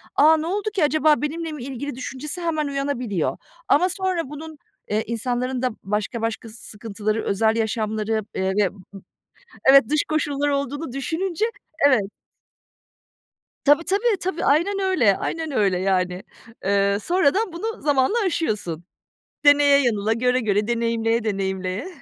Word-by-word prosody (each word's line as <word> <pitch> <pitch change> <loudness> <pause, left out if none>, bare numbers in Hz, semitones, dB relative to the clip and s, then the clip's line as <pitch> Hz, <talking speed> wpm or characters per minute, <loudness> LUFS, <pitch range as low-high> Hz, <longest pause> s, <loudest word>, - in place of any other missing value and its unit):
"A, 315 +2 +6
ne 310 - -3
oldu 410 +4 -1
ki 385 -6 +1
acaba? 305 0 +3
Benimle 320 +2 -3
mi 300 -5 -7
ilgili?" 275 +1 -5
düşüncesi 270 +6 -6
hemen 310 -3 -1
uyanabiliyor. 275 - -2 0.3
Ama 365 - +4
sonra 370 -5 -2
bunun, 310 +1 -9 0.3
eee, 215 +1 0
insanların 245 +2 -2
da 255 - +1
başka 210 +3 -2
başka 225 0 -3
sıkıntıları, 215 -1 -4
özel 220 +2 +2
yaşamları, 220 -1 -1
eee, 190 0 0
ve 190 - -2
b - - -18
b - - -17 0.9
evet, 270 -3 +7
dış 300 0 +2
koşulları 290 -2 0
olduğunu 280 +1 -3
düşününce, 345 +7 -1 0.4
evet. 260 -6 +4 1.6
Tabii, 295 +3 +4
tabii, 410 +4 +1
tabii. 365 -1 -2
Aynen 345 +8 +2
öyle, 310 - +3
aynen 320 -2 -3
öyle, 200 -8 +1
yani. 185 -1 0 0.4
Iıı, 200 0 +2
sonradan 365 - +1
bunu 435 +6 -5
zamanla 285 - +2
aşıyorsun. 210 - -2 0.6
Deneye 290 -1 +6
yanıla, 220 -3 +1
göre 250 +2 +1
göre, 210 -2 +1
deneyimleye 230 -1 0
deneyimleye. 190 - -2
260 Hz, 140 wpm, -23 LUFS, 215-315 Hz, 1.6 s, evet